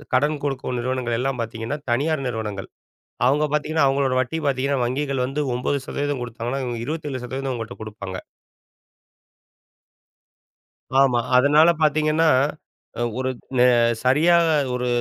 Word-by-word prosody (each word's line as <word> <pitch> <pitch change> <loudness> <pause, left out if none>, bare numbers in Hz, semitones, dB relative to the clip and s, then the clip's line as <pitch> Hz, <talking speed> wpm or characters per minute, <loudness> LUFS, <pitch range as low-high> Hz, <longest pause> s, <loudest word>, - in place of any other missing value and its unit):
கடன் 145 +3 +1
குடுக்கும் 135 -3 -2
நிறுவனங்கள் 125 -1 -1
எல்லாம் 130 0 -1
பாத்தீங்கன்னா 115 +4 -4
தனியார் 140 +3 0
நிறுவனங்கள். 105 -5 -4 0.6
அவங்க 145 +4 +3
பாத்தீங்கன்னா 150 -1 +1
அவங்களோட 135 -1 +1
வட்டி 130 +6 -2
பாத்தீங்கன்னா 135 0 0
வங்கிகள் 135 +1 -1
வந்து 140 +3 -2
9% 140 +1 -2
கொடுத்தாங்கனா, 120 +3 -4
இவங்க 120 -2 -4
27% 135 -4 -4
உங்கள்ட்ட 115 0 -6
குடுப்பாங்க. 100 -3 -7 2.8
ஆமா. 130 -3 +4 0.2
அதனால 150 +5 +5
பாத்தீங்கன்னா 155 +1 +3 0.9
ஒருக் 130 -1 -3 0.2
நெ 125 - +6 0.4
சரியாகா 165 +5 +4 0.2
ஒரு 125 0 -2
130 Hz, 110 wpm, -22 LUFS, 120-145 Hz, 2.8 s, நெ